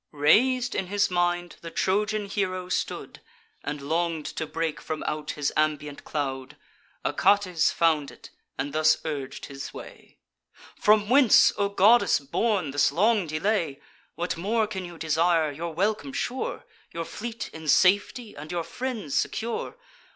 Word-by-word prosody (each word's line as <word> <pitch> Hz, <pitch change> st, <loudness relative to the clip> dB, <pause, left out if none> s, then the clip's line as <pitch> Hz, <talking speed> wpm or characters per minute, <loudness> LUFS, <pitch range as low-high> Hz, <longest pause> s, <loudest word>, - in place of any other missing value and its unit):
Rais'd 245 Hz, -, +3 dB
in 190 Hz, -, -2 dB
his 205 Hz, +1 st, +1 dB
mind 175 Hz, 0 st, 0 dB
the 165 Hz, -, -7 dB
Trojan 210 Hz, +4 st, 0 dB
hero 185 Hz, -2 st, -2 dB
stood, -, -, -3 dB, 0.4 s
And 145 Hz, -1 st, -5 dB
long'd 165 Hz, +1 st, -1 dB
to 160 Hz, -, -4 dB
break 165 Hz, -1 st, -3 dB
from 155 Hz, -1 st, -4 dB
out 150 Hz, 0 st, -3 dB
his 145 Hz, -1 st, -1 dB
ambient 150 Hz, -1 st, -1 dB
cloud: 135 Hz, -1 st, -4 dB, 0.5 s
Achates 185 Hz, -5 st, +3 dB
found 155 Hz, -4 st, +2 dB
it, -, -, -14 dB, 0.3 s
and 140 Hz, +1 st, -3 dB
thus 155 Hz, 0 st, +4 dB
urg'd 140 Hz, -4 st, -5 dB
his 135 Hz, -1 st, -8 dB
way: -, -, -12 dB, 0.6 s
"From 210 Hz, 0 st, +3 dB
whence, 255 Hz, 0 st, +6 dB
O 200 Hz, -1 st, 0 dB
goddess 210 Hz, +4 st, +5 dB
born, 175 Hz, +3 st, -1 dB
this 145 Hz, 0 st, +3 dB
long 205 Hz, +3 st, +2 dB
delay? 155 Hz, -2 st, -1 dB, 0.4 s
What 175 Hz, 0 st, -3 dB
more 215 Hz, +6 st, +1 dB
can 190 Hz, -3 st, -5 dB
you 175 Hz, -1 st, -10 dB
desire, 160 Hz, 0 st, +2 dB
your 165 Hz, +4 st, -5 dB
welcome 215 Hz, -, -1 dB
sure, 280 Hz, -, -3 dB, 0.3 s
Your 165 Hz, 0 st, -4 dB
fleet 230 Hz, +4 st, -6 dB
in 160 Hz, -1 st, -9 dB
safety, 205 Hz, -, +3 dB
and 150 Hz, +3 st, -8 dB
your 175 Hz, -1 st, -2 dB
friends 230 Hz, -, -5 dB
secure? 230 Hz, -, -2 dB
175 Hz, 145 wpm, -26 LUFS, 155-210 Hz, 0.6 s, whence